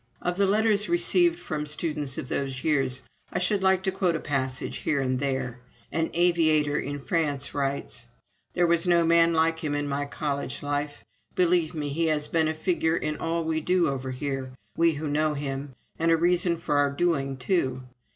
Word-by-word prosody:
Of 175 Hz, 0 st, -2 dB
the 200 Hz, 0 st, +3 dB
letters 210 Hz, 0 st, +2 dB
received 345 Hz, 0 st, +3 dB
from 150 Hz, -, -4 dB
students 150 Hz, -3 st, -3 dB
of -, -, -4 dB
those 135 Hz, 0 st, -3 dB
years 135 Hz, -4 st, +1 dB, 0.3 s
I -, -, -2 dB
should 190 Hz, +2 st, +1 dB
like 190 Hz, -1 st, +3 dB
to 190 Hz, -, +1 dB
quote 185 Hz, -3 st, 0 dB
a -, -, -1 dB
passage 130 Hz, -3 st, -2 dB
here 145 Hz, -, 0 dB
and 130 Hz, -1 st, 0 dB
there. 130 Hz, -3 st, -2 dB, 0.3 s
An 165 Hz, 0 st, 0 dB
aviator 160 Hz, -4 st, +3 dB
in 145 Hz, +1 st, -4 dB
France 145 Hz, -3 st, -1 dB
writes: 140 Hz, -1 st, -3 dB, 0.5 s
"There 175 Hz, -, +3 dB
was 170 Hz, +1 st, +2 dB
no 170 Hz, -1 st, +4 dB
man 170 Hz, 0 st, +4 dB
like 160 Hz, 0 st, +2 dB
him 150 Hz, -3 st, -2 dB
in 145 Hz, 0 st, -1 dB
my 145 Hz, 0 st, -2 dB
college 140 Hz, -1 st, -3 dB
life. 145 Hz, 0 st, -3 dB, 0.3 s
Believe 175 Hz, -2 st, +2 dB
me, 150 Hz, -2 st, -2 dB
he 165 Hz, +4 st, 0 dB
has 150 Hz, -2 st, 0 dB
been 160 Hz, -2 st, +1 dB
a 155 Hz, -, 0 dB
figure 165 Hz, 0 st, +1 dB
in 150 Hz, 0 st, -2 dB
all 165 Hz, 0 st, -1 dB
we 160 Hz, 0 st, -1 dB
do 175 Hz, -1 st, +2 dB
over 130 Hz, -1 st, -3 dB
here, 130 Hz, 0 st, -4 dB, 0.2 s
we 165 Hz, 0 st, +3 dB
who 150 Hz, +1 st, -4 dB
knew 150 Hz, +1 st, +1 dB
him, 140 Hz, -1 st, -4 dB, 0.2 s
and 165 Hz, +1 st, +2 dB
a 165 Hz, -, +5 dB
reason 175 Hz, 0 st, +2 dB
for 150 Hz, -3 st, -1 dB
our 145 Hz, 0 st, +3 dB
doing, 140 Hz, -3 st, 0 dB
too. 130 Hz, -3 st, 0 dB
155 Hz, 190 wpm, -26 LUFS, 140-170 Hz, 0.5 s, a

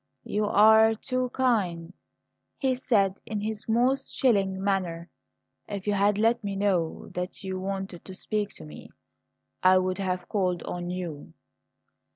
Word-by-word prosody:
"You 210 Hz, 0 st, 0 dB
are 220 Hz, +2 st, +6 dB
too 255 Hz, +2 st, -2 dB
kind," 190 Hz, -10 st, 0 dB, 0.6 s
he 265 Hz, -2 st, +1 dB
said 205 Hz, -7 st, +1 dB
in 215 Hz, -1 st, -4 dB
his 215 Hz, +1 st, -4 dB
most 255 Hz, +4 st, +2 dB
chilling 195 Hz, -7 st, +2 dB
manner. 180 Hz, -4 st, -1 dB, 0.6 s
"If 200 Hz, -2 st, -5 dB
you 205 Hz, -, +1 dB
had 200 Hz, +1 st, +2 dB
let 225 Hz, +2 st, +2 dB
me 200 Hz, -1 st, -3 dB
know 190 Hz, -5 st, -1 dB
that 180 Hz, +2 st, -5 dB
you 190 Hz, -1 st, -4 dB
wanted 195 Hz, -2 st, -5 dB
to 190 Hz, -, -8 dB
speak 210 Hz, +1 st, -2 dB
to 80 Hz, -, -10 dB
me 75 Hz, 0 st, -11 dB, 0.7 s
I 185 Hz, 0 st, +6 dB
would 185 Hz, +1 st, 0 dB
have 185 Hz, -2 st, -2 dB
called 180 Hz, -4 st, -1 dB
on 175 Hz, 0 st, -5 dB
you." 170 Hz, -, -6 dB
195 Hz, 150 wpm, -27 LUFS, 185-220 Hz, 0.7 s, are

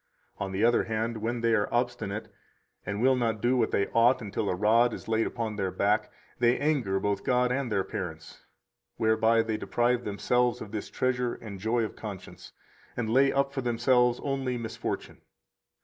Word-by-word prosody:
122 -, -, -28 dB
On 95 Hz, -, -4 dB
the 100 Hz, +4 st, +2 dB
other 120 Hz, -, +2 dB
hand, 110 Hz, +1 st, -1 dB
when 120 Hz, +1 st, -2 dB
they 115 Hz, 0 st, +2 dB
are 105 Hz, -2 st, +1 dB
obstinate, 110 Hz, -4 st, -2 dB, 0.5 s
and 105 Hz, +3 st, -2 dB
will 130 Hz, 0 st, +5 dB
not 115 Hz, -3 st, 0 dB
do 120 Hz, +4 st, +2 dB
what 120 Hz, -3 st, +2 dB
they 100 Hz, -, +1 dB
ought 120 Hz, +3 st, +4 dB
until 105 Hz, -2 st, -3 dB
a -, -, 0 dB
rod 115 Hz, +5 st, +3 dB
is -, -, -11 dB
laid 110 Hz, 0 st, +1 dB
upon 115 Hz, -3 st, -4 dB
their 95 Hz, -2 st, 0 dB
back, 100 Hz, +3 st, 0 dB, 0.3 s
they 120 Hz, 0 st, +3 dB
anger 130 Hz, -11 st, 0 dB
both 100 Hz, 0 st, -1 dB
God 125 Hz, 0 st, +2 dB
and 130 Hz, -2 st, -1 dB
their 95 Hz, -2 st, +1 dB
parents, 80 Hz, -5 st, -7 dB, 0.5 s
whereby 110 Hz, +1 st, +3 dB
they 110 Hz, -1 st, -2 dB
deprive 120 Hz, +2 st, 0 dB
themselves 120 Hz, +4 st, +1 dB
of 100 Hz, -, -8 dB
this 110 Hz, -2 st, -5 dB
treasure 125 Hz, -1 st, -1 dB
and 100 Hz, -4 st, -9 dB
joy 115 Hz, +4 st, +1 dB
of 110 Hz, -, -5 dB
conscience, 105 Hz, -4 st, -9 dB, 0.5 s
and 110 Hz, -2 st, -1 dB
lay 135 Hz, +2 st, +5 dB
up 140 Hz, 0 st, 0 dB
for 135 Hz, -, -2 dB
themselves 125 Hz, 0 st, +2 dB
only 135 Hz, -3 st, -1 dB
misfortune. 115 Hz, -2 st, -5 dB
115 Hz, 185 wpm, -28 LUFS, 105-125 Hz, 0.5 s, will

